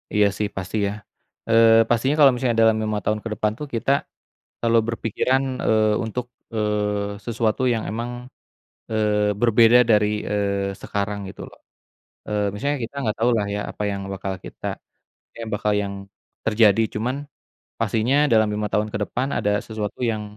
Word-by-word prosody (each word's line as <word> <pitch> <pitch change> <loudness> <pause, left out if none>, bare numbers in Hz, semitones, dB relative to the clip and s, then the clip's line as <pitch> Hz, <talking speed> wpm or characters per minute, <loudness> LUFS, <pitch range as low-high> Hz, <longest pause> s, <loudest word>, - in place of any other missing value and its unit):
Iya 105 -1 +5
sih 105 - 0
pasti 95 +2 -4
ya, - - -2 0.6
eee, 115 0 +6
pastinya 125 +5 +2
kalau 140 -3 +8
misalnya 120 -2 0
dalam 110 -1 +4
5 110 -1 -1
tahun 105 0 +1
ke 115 - -4
depan 105 0 0
tuh 150 - -5
kita, 115 +4 0 0.7
selalu 115 0 +3
berpikiran, 115 +3 0 0.2
eee, 110 -1 +3
untuk, 120 +2 -4 0.3
eee, 105 -1 -1
sesuatu 115 0 0
yang 110 - -2
emang, 115 +3 -3 0.8
eee, 105 -1 +1
berbeda 115 0 +6
dari, 105 -1 +5 0.2
eee, 100 -1 -1
sekarang 105 0 -2
gitu - - -10
loh, - - -18 0.7
eee, 105 -1 0
misalnya 140 +8 -1
kita 115 - -9
enggak 110 -6 -1
tahu 120 +2 +3
lah 105 - -1
ya 105 - -2
apa - - -6
yang 100 -1 -3
bakal 95 0 -4
kita - - -8 0.7
kayak 115 -1 -6
bakal 105 0 0
yang, 100 0 -4 0.5
terjadi 110 -1 +4
cuman, 120 +5 -1 0.7
pastinya 115 +5 +1 0.2
dalam 110 -1 +4
5 105 0 -1
tahun 105 +1 0
ke - - -2
depan 130 +3 -2
ada 105 0 0
sesuatu 110 -1 -5
yang, 110 -2 -1
110 Hz, 160 wpm, -23 LUFS, 105-115 Hz, 0.8 s, kalau